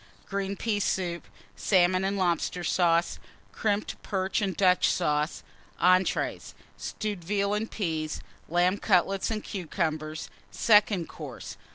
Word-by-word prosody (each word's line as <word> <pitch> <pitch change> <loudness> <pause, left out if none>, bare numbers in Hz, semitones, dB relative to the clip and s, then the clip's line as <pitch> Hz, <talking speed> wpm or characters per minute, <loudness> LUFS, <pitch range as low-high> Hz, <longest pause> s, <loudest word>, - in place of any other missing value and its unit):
Green 200 0 -3
Pea 210 0 -1
Soup. 175 - -1 0.3
Salmon 185 - +3
and 195 +1 0
Lobster 175 -1 0
Sauce. 170 -1 +2 0.3
Crimped 210 -2 -1
Perch 190 +1 -1
and 190 -4 -1
Dutch 185 -2 +4
Sauce. 150 -2 0 0.4
ENTREES. 185 +1 +2 0.2
Stewed 205 -5 -4
Veal 200 +2 0
and 215 +2 -1
Peas. 160 -6 -2 0.3
Lamb 180 +4 +2
Cutlets 195 0 +2
and 215 -2 -3
Cucumbers. 155 -4 -3 0.2
SECOND 205 -5 +3
COURSE. - - -8
185 Hz, 120 wpm, -28 LUFS, 170-200 Hz, 0.4 s, Dutch